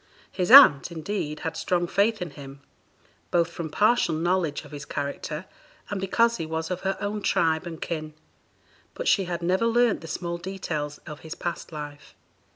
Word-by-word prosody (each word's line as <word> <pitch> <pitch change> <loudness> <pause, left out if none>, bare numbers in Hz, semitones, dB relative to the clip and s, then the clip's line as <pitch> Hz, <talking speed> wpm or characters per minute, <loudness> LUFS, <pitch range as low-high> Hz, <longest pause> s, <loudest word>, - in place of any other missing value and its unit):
His 180 0 -2
aunt, 200 - +9
indeed, 160 -2 -4
had 160 0 -3
strong 175 +1 0
faith 200 +3 +1
in 170 - -8
him, 140 -1 -11 0.7
both 170 -1 +1
from 170 -2 -5
partial 210 -1 +2
knowledge 170 -2 0
of - - -14
his 145 -1 -7
character, 150 +3 -4 0.5
and 200 -2 -2
because 230 +4 +2
he 165 - -3
was 160 +1 -3
of 180 - -3
her 190 0 -1
own 205 +1 -3
tribe 160 -3 +1
and 165 -2 -7
kin; 155 -2 -5 0.8
but - - -4
she 195 - +3
had 175 -1 -4
never 185 +6 +2
learnt 235 -1 +2
the 165 - -9
small 170 +2 -4
details 165 -6 -4
of 150 -2 -8
his 160 0 -8
past 175 -1 -5
life. 150 -1 -9
170 Hz, 175 wpm, -26 LUFS, 155-195 Hz, 0.8 s, aunt